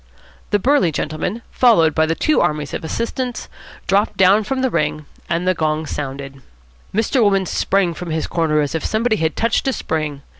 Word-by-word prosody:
The 205 - +3
burly 260 - +2
gentleman, 160 +10 -3
followed 190 -11 +4
by 160 0 +2
the 165 - 0
two 310 - +2
armies 150 -2 -1
of - - -4
assistants, 235 +8 -3 0.4
dropped 200 +2 +1
down 195 +3 +5
from 260 +4 -2
the 260 - +1
ring, 150 -2 -1 0.2
and 170 +2 -1
the 185 - +4
gong 155 -2 -1
sounded. 135 -2 -6 0.5
Mr. 225 +5 +1
Wolmann 195 -3 +3
sprang 190 -3 +1
from 175 +2 -7
his 160 0 -1
corner 155 -3 +1
as 145 - -2
if 160 - -2
somebody 220 0 +1
had 160 -1 -1
touched 230 +3 0
a 265 - +2
spring. 150 - -3
170 Hz, 185 wpm, -19 LUFS, 155-220 Hz, 0.5 s, down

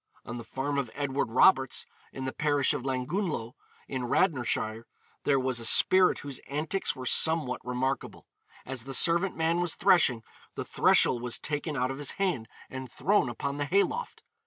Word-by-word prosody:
On 120 - -6
the 120 - -7
farm 140 +4 -3
of 130 -4 -3
Edward 140 -5 -2
Roberts, 130 +1 +3 0.3
in 130 - -6
the 130 - -2
parish 145 -3 +1
of - - -4
Llangunllo, 135 - -3 0.3
in 130 -2 -4
Radnorshire, 120 - 0 0.4
there 140 -2 +3
was 130 -2 -1
a - - -6
spirit 185 +10 +6
whose 140 -3 -6
antics 155 +7 -1
were 130 - -8
somewhat 160 -1 +2
remarkable. 130 +2 -3 0.4
As 130 -2 -6
the 135 -1 -3
servant 170 +6 +2
man 165 +1 0
was 175 -2 0
threshing, 165 - +3 0.3
the - - -5
threshel 125 - +3
was 125 -1 -1
taken 150 0 -3
out 125 +1 0
of 135 - -7
his 145 - -1
hand 180 -13 -2 0.2
and 130 -2 -8
thrown 180 -2 +1
upon 140 +4 -4
the 145 - -2
hay 195 +7 +3
loft. 480 +1 -6
135 Hz, 175 wpm, -28 LUFS, 125-160 Hz, 0.4 s, spirit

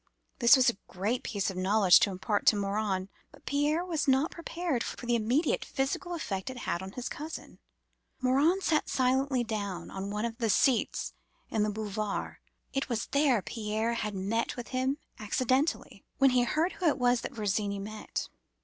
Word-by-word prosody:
This 235 +2 +8
was 260 -1 +4
a 235 -4 +2
great 205 +7 -1
piece 200 -2 -2
of 185 - -8
knowledge 190 -1 +6
to - - +3
impart 200 +2 -2
to - - +7
Morin. 200 -1 -1 0.2
But - - -19
Pierre 295 +4 +1
was 320 -5 -1
not 270 +4 +3
prepared 335 -6 -2
for - - -6
the 240 - +1
immediate 240 +7 +1
physical 280 +6 -2
effect 195 - -3
it 260 - -7
had 175 -7 -2
on 190 +1 -7
his 250 - -4
cousin. 310 +2 -7 0.6
Morin 280 +9 +3
sat 315 -4 +1
suddenly 260 0 +2
down 205 -5 -4
on 195 +1 -4
one 210 +2 -2
of 230 +1 -5
the 230 -2 +1
seats 240 +3 +2 0.4
in 220 - +1
the 210 - +2
Boulevards—it 215 +5 -4
was 235 -2 -1
there 280 -8 +3
Pierre 220 +2 -2
had 210 -3 -3
met 205 +5 -1
with 245 - -6
him 260 +2 0 0.2
accidentally—when 260 +4 0
he 250 -1 +3
heard 320 +8 +1
who 360 - -1
it 300 - +3
was 245 -1 +3
that - - -6
Virginie 205 -1 -1
met. 215 +2 -5
235 Hz, 175 wpm, -30 LUFS, 210-270 Hz, 0.6 s, This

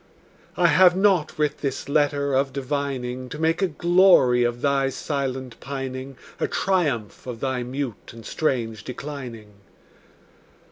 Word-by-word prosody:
I - - +3
have 180 -1 +6
not 190 -5 +2
writ 150 -1 0
this 140 -3 -3
letter 145 -1 +1
of 135 +1 +1
divining 130 -2 -3
To 150 - -6
make 160 +3 +1
a 190 - +3
glory 170 -7 +4
of 120 0 -1
thy 140 -1 +2
silent 130 -3 -4
pining, 135 -1 -6 0.2
A - - +1
triumph 145 - -1
of 120 -2 -5
thy 130 -1 -1
mute 125 -1 -5
and 115 -1 -12
strange 115 -8 -1
declining. 125 -6 -7
135 Hz, 135 wpm, -24 LUFS, 125-150 Hz, 0.2 s, have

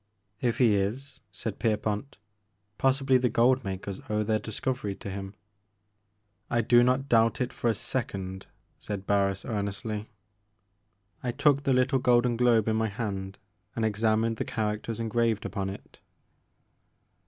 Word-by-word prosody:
If 120 -2 +1
he 115 -5 +4
is," 130 +8 -3
said 105 +1 -5
Kerpont, 110 +3 -1 0.6
possibly 135 -1 +3
the 125 0 +2
gold 125 +3 +3
makers 95 -1 -5
owe 105 0 +1
their 110 0 +1
discovery 110 0 -3
to 100 - -7
him." 95 +1 -6 1.1
I 120 -1 +2
do 120 +2 +5
not 130 +2 +2
doubt 115 -2 +3
it 125 0 -1
for 120 - 0
a 115 - +1
second," 100 -6 -4 0.3
said 100 -2 -5
Barris 100 -1 +1
earnestly. 105 0 -3 1.1
I 125 - -1
took 140 +1 +2
the 135 - +3
little 130 +1 +3
golden 125 -1 +3
globe 115 -3 +3
in 110 0 +2
my 110 0 +1
hand, 100 -3 -4 0.4
and 115 - 0
examined 110 +1 +1
the - - -1
characters 110 +1 -3
engraved 115 -1 0
upon 100 -2 -3
it. 100 - -10
110 Hz, 140 wpm, -28 LUFS, 100-125 Hz, 1.1 s, do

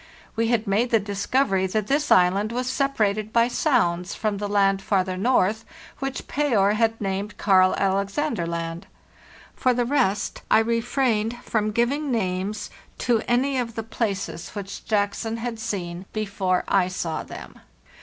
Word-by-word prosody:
We 230 0 +1
had 230 -1 +1
made 215 +5 +1
the 225 - +4
discovery 200 0 0
that 215 +2 -1
this 290 +6 0
island 190 +4 +4
was 250 +2 -2
sepa 275 +2 -1
rated 210 +1 +1
by 230 +1 +4
sounds 180 - +1
from 215 -2 -1
the 205 0 -3
land 195 -1 +2
farther 190 -2 0
north 220 0 +2 0.4
which 270 -1 -4
Payer 235 -9 +2
had 225 +1 +1
named 200 +1 -3
Karl 185 -2 +4
Alexander 200 - 0
Land. 170 0 -4 0.7
For 255 -1 +2
the 245 0 +1
rest, 235 -7 0
I - - +6
re 230 +1 +2
frained 240 -2 0
from 215 -1 0
giving 250 +7 0
names 200 -1 -2 0.3
to 230 -2 +1
any 260 +2 +2
of 230 -2 -3
the 225 - -3
places 200 -6 -3
which 200 -1 -7
Jackson 215 +2 -1
had 230 -1 -4
seen 190 -5 -4
before 195 -4 0
I 190 -2 +3
saw 170 -4 -3
them. - - -10
215 Hz, 155 wpm, -24 LUFS, 195-235 Hz, 0.7 s, I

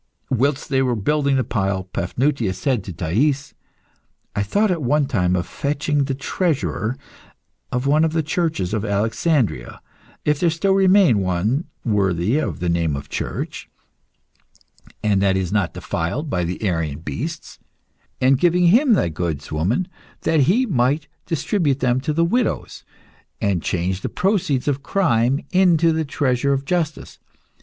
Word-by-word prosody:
Whilst 135 +3 +1
they 135 -2 +2
were 125 -2 +1
building 140 +6 +1
the 130 - +2
pile, 95 -5 -1
Paphnutius 105 +3 -1
said 120 +1 0
to 95 - -6
Thais 120 - 0 0.8
"I 100 - 0
thought 205 - +1
at 170 -3 -1
one 145 +3 +2
time 90 -8 +1
of 90 - -1
fetching 145 0 -1
the 135 - -2
treasurer 135 - -1 0.7
of 125 +2 -1
one 150 +3 +3
of 160 - +2
the 160 0 0
churches 155 - -1
of 110 -2 -1
Alexandria 110 - 0 0.5
(if 150 -1 +2
there 175 - +3
still 170 +5 0
remain 190 - +5
one 100 - 0 0.2
worthy 100 - +1
of 155 - -3
the 90 - -1
name 85 -3 +1
of 70 0 -7
church, - - -5 1.3
and 100 -2 +2
that 95 -1 +2
is 95 -2 -2
not 100 -4 0
defiled 125 - -3
by 90 -2 0
the 90 +5 -4
Arian 80 -6 -1
beasts) 155 - -6 0.6
and 130 +1 +3
giving 175 +1 +4
him 245 - +5
thy 195 - +2
goods, 80 -3 -4
woman, 95 - 0 0.3
that 160 - +2
he 245 +8 +3
might 145 - +1 0.2
distribute 160 -3 0
them 125 0 +1
to 155 +3 0
widows, 235 +8 -1 0.6
and 95 -4 0
change 90 +3 -2
the - - -3
proceeds 180 -9 0
of 140 -1 0
crime 135 -6 +1
into 175 -3 +4
the 160 0 -1
treasure 140 -1 0
of 135 0 -2
justice. 160 -1 -2
135 Hz, 150 wpm, -21 LUFS, 95-160 Hz, 1.3 s, remain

